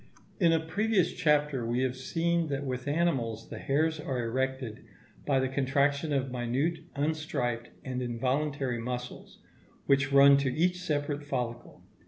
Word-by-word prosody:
In 170 -4 +5
a 165 - +3
previous 185 +3 +1
chapter 150 -6 +2
we 120 +2 0
have 130 -1 0
seen 165 +5 0
that 140 -1 -3
with 130 0 -4
animals 135 -8 0
the - - -7
hairs 155 +3 +1
are 130 -5 -2
erected 130 -1 -2 0.4
by 135 -2 +3
the 130 - +1
contraction 140 +3 +1
of 135 -2 0
minute, 130 +7 -1 0.2
unstriped, 140 -6 -2 0.2
and 130 -1 -3
involuntary 130 +1 -1
muscles, 125 +1 -6 0.5
which 140 +1 +3
run 140 0 +8
to 140 -2 0
each 180 +6 +1
separate 145 -3 -2
follicle. 120 -4 -4
140 Hz, 145 wpm, -29 LUFS, 125-155 Hz, 0.5 s, run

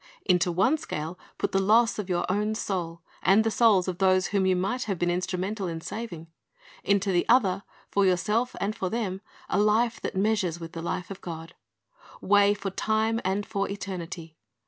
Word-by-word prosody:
Into 180 -1 +3
one 195 - +2
scale 160 - -5 0.2
put - - -1
the 195 - +2
loss 220 +3 +4
of 200 -2 -4
your 175 -1 0
own 210 +3 0
soul, 170 -5 -3 0.2
and 200 +3 +5
the 225 - 0
souls 210 -4 +4
of 180 -1 -3
those 185 -1 +3
whom 195 -2 +2
you 185 - +3
might 195 +8 -1
have 195 -4 -2
been 175 +1 +1
instrumental 185 +3 -2
in 165 -1 -4
saving; 175 -3 -6 0.6
into 200 0 +2
the 175 -1 +2
other, 200 -7 +4 0.3
for 200 - +3
yourself 210 +7 +1
and 210 +2 -1
for 190 -4 -2
them, 195 -4 -2 0.3
a - - 0
life 220 +3 +2
that - - -4
measures 190 -4 +1
with 165 -1 -7
the 165 -2 -6
life 180 +2 -4
of 195 - -8
God. 165 -1 -7 0.7
Weigh 205 +1 +4
for 200 -1 -4
time 220 +3 0
and 195 +2 -1
for 200 -2 -2
eternity. 180 -5 -6
195 Hz, 190 wpm, -27 LUFS, 180-210 Hz, 0.7 s, and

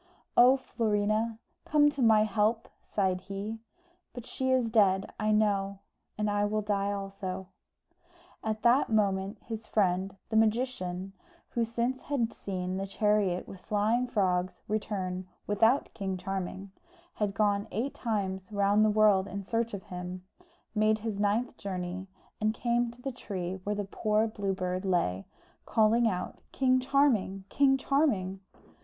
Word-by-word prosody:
"Oh, 255 +2 +7
Florina, 220 -2 0 0.3
come 295 -1 +4
to 285 -2 -4
my 220 -2 +6
help!" 215 +2 +1 0.2
sighed 185 -3 0
he, 200 +4 -5 0.5
"But 245 -2 -8
she 260 0 -2
is 255 -2 +3
dead, 195 -4 +3
I 215 - +1
know, 200 -2 +2 0.4
and 210 0 0
I 205 0 +1
will 215 +1 -1
die 200 -1 0
also." 195 -2 -5 0.9
At 215 0 -2
that 245 +4 +4
moment, 200 -1 +1
his 225 -1 -6
friend, 190 -1 +1
the 220 - -2
magician, 215 -5 0 0.4
who 235 - 0
since 235 +3 -1
he - - -20
had 250 -6 0
seen 185 -1 -4
the 195 +1 -3
chariot 200 -3 +1
with 195 - -10
flying 215 +6 +1
frogs 185 -5 0
return 190 -4 -2 0.2
without 225 +6 +2
King 190 -2 -3
Charming, 190 +1 -4 0.4
had 205 -2 -2
gone 205 0 +1
eight 255 +6 -2
times 195 -4 -3
round 200 +1 +3
the 215 - +4
world 210 -2 +4
in 200 0 -5
search 230 +3 -1
of 190 - -8
him, 180 0 -6 0.5
made 215 0 +3
his 215 -2 -4
ninth 210 +5 0
journey, 185 -1 -4 0.3
and 215 +1 +1
came 240 0 +1
to 240 +1 -14
the 270 - -2
tree 190 -6 -5
where 210 +1 -1
the 205 0 -2
poor 215 +2 +1
Blue 205 -3 -2
Bird 185 0 -2
lay, 170 - 0 0.4
calling 225 +2 +4
out, 185 -4 -3
"King 255 -1 +3
Charming, 255 -8 +2
King 270 -1 +4
Charming!" 255 -10 +1
210 Hz, 150 wpm, -30 LUFS, 190-225 Hz, 0.9 s, Oh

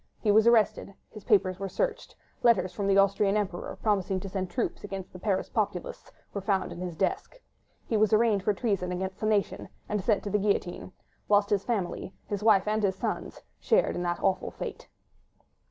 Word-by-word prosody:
He 210 - +2
was 220 +2 +5
arrested. 220 -3 +3 0.2
His 215 -2 -11
papers 190 -5 +2
were 195 0 -3
searched: 185 - -2 0.3
letters 215 -6 +3
from 200 -2 -2
the 195 0 +4
Austrian 200 +1 +3
Emperor, 190 -4 -3
promising 195 -3 +1
to 195 - -6
send 185 -1 -3
troops 240 -1 -3
against 195 -2 -7
the 180 - -9
Paris 190 0 0
populace, 205 -6 -3 0.2
were 200 - -3
found 195 -1 0
in - - -8
his 180 -2 -4
desk. 195 - -2 0.5
He 225 - 0
was 215 -1 +3
arraigned 215 -2 +3
for 210 - +2
treason 195 -4 -1
against 190 +1 -4
the 215 - -1
nation, 210 -2 0 0.2
and 210 -1 -1
sent 205 +1 +1
to 205 - -4
the 210 - +2
guillotine, 195 -3 -1 0.4
whilst 205 0 +3
his 200 -2 +2
family, 195 -5 -3
his 205 -1 -4
wife 210 -3 +4
and 215 +1 +1
his 195 -2 +1
sons, - - -4 0.2
shared - - +2
this 175 -1 -2
awful 190 -1 +1
fate. - - -7
200 Hz, 190 wpm, -28 LUFS, 190-210 Hz, 0.5 s, was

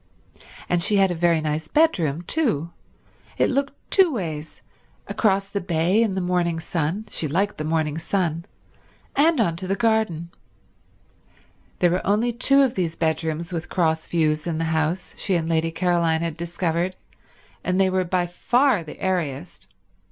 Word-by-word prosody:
And 175 -1 +1
she 205 - +3
had 195 -2 +4
a - - 0
very 170 -1 +2
nice 155 0 -2
bedroom, 175 - +2
too; 185 - 0 0.7
it - - +2
looked 280 +1 0 0.2
two 380 -4 +5
ways, 160 - -5 0.4
across 195 -2 +1
the 200 0 -3
bay 175 +4 +2
in 215 -5 +1
the 190 - -1
morning 175 -2 0
sun—she 165 +2 -3
liked 195 +7 -1
the - - -2
morning 155 -1 -1
sun—and 190 - -2
onto 185 -3 0
the 195 - 0
garden. 220 -8 0 1.5
There 175 -1 +3
were 180 - 0
only 215 +4 +2
two 275 +4 +4
of 260 -3 +1
these 170 -3 -2
bedrooms 160 +1 -2
with 165 -1 -4
cross 160 -3 0
views 155 -1 0
in 165 -2 -1
the 165 - -1
house, 160 +3 -1
she 190 - 0
and 165 -2 0
Lady 165 0 +1
Caroline 165 -1 +1
had 165 -2 -2
discovered, 170 +1 -2 0.7
and 185 +1 0
they 190 -1 +3
were 185 0 +1
by 180 0 0
far 240 +5 +2
the 155 - -11
airiest. 175 -4 -3
175 Hz, 155 wpm, -23 LUFS, 160-195 Hz, 1.5 s, two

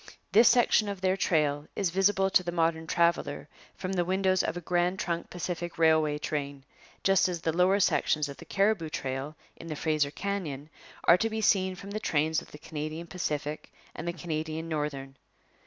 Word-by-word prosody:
This 225 +2 +7
section 225 -3 +4
of 200 -2 -5
their 185 0 +2
trail 150 -5 +1
is 190 -4 0
visible 195 +1 +2
to 185 - +5
the 175 -1 -4
modern 165 -1 0
traveller 170 +1 +1 0.3
from 185 0 -4
the 180 -2 +1
windows 185 +1 +2
of - - -2
a - - -2
Grand 175 +1 0
Trunk 170 -2 -3
Pacific 175 -1 -5
Railway 160 -2 +3
train, 145 -2 -4 0.4
just 195 -1 +4
as 175 -2 -3
the 160 -1 -1
lower 185 +3 +4
sections 150 -5 +2
of 140 - -9
the - - -12
Cariboo 195 -5 +1
Trail 135 +1 -4 0.2
in 165 - -10
the 155 - -4
Fraser 155 -1 +1
Canyon 155 -5 -4 0.3
are 170 - +6
to 225 - +1
be 220 0 -3
seen 190 -3 +2
from 200 +2 -9
the 215 - -3
trains 155 -3 +1
of - - -15
the - - -11
Canadian 155 +2 -6
Pacific 155 -3 -4 0.2
and 165 - -7
the 170 - -1
Canadian 160 -1 -4
Northern. 140 -4 -4
170 Hz, 190 wpm, -29 LUFS, 155-190 Hz, 0.4 s, This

